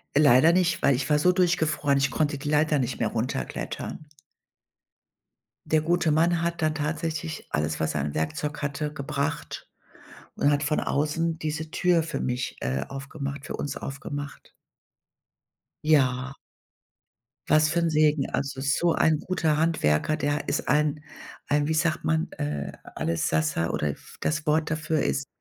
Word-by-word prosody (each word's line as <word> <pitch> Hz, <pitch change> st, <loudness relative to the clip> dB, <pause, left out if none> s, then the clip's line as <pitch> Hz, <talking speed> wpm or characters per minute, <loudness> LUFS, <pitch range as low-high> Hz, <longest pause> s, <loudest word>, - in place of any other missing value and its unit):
Leider 145 Hz, +2 st, +6 dB
nicht, 180 Hz, 0 st, +2 dB
weil 140 Hz, -, +4 dB
ich 130 Hz, +2 st, -2 dB
war 150 Hz, 0 st, +4 dB
so 180 Hz, +4 st, +4 dB
durchgefroren, 160 Hz, -6 st, +2 dB
ich 135 Hz, -1 st, +1 dB
konnte 150 Hz, -2 st, 0 dB
die 145 Hz, +2 st, -5 dB
Leiter 150 Hz, 0 st, +3 dB
nicht 125 Hz, -1 st, -2 dB
mehr 115 Hz, -, +1 dB
runterklettern. 115 Hz, -, -4 dB, 1.6 s
Der 155 Hz, 0 st, +2 dB
gute 170 Hz, +1 st, +1 dB
Mann 165 Hz, +2 st, +3 dB
hat 170 Hz, -1 st, -1 dB
dann 155 Hz, 0 st, +2 dB
tatsächlich 160 Hz, +1 st, -3 dB
alles, 75 Hz, +1 st, -1 dB
was 80 Hz, 0 st, 0 dB
er 75 Hz, -, -1 dB
an 70 Hz, +1 st, -3 dB
Werkzeug 80 Hz, -, -2 dB
hatte, 145 Hz, +1 st, -2 dB
gebracht 150 Hz, +1 st, -4 dB, 0.7 s
und 145 Hz, -, +2 dB
hat 145 Hz, 0 st, +1 dB
von 150 Hz, +1 st, +1 dB
außen 160 Hz, +3 st, 0 dB
diese 155 Hz, 0 st, -4 dB
Tür 175 Hz, 0 st, +2 dB
für 165 Hz, 0 st, -4 dB
mich 125 Hz, 0 st, -2 dB
äh, 65 Hz, +1 st, -2 dB
aufgemacht 140 Hz, 0 st, -6 dB
für -, -, -5 dB
uns 145 Hz, -, -4 dB
aufgemacht. 140 Hz, 0 st, -6 dB, 1.3 s
Ja. 135 Hz, -3 st, +2 dB, 1.1 s
Was 155 Hz, +1 st, +4 dB
für 165 Hz, +2 st, +1 dB
'n 170 Hz, -1 st, +1 dB
Segen, 155 Hz, -2 st, +2 dB
also 135 Hz, -1 st, -3 dB
so 145 Hz, +5 st, +2 dB
ein 155 Hz, -2 st, +3 dB
guter 165 Hz, -4 st, 0 dB
Handwerker, 155 Hz, -, +2 dB
der 145 Hz, 0 st, -1 dB
ist -, -, -1 dB
ein 150 Hz, 0 st, +2 dB, 0.4 s
ein, 145 Hz, 0 st, +2 dB
wie 160 Hz, -, +1 dB
sagt 160 Hz, 0 st, 0 dB
man, 160 Hz, +2 st, 0 dB
äh, 75 Hz, -1 st, -3 dB, 0.2 s
Allessassa 80 Hz, 0 st, 0 dB
oder 75 Hz, -, -1 dB
f 70 Hz, -, -8 dB
das 155 Hz, 0 st, -1 dB
Wort 155 Hz, 0 st, +2 dB
dafür 160 Hz, 0 st, 0 dB
ist 140 Hz, 0 st, -1 dB
150 Hz, 155 wpm, -26 LUFS, 135-160 Hz, 1.6 s, Leider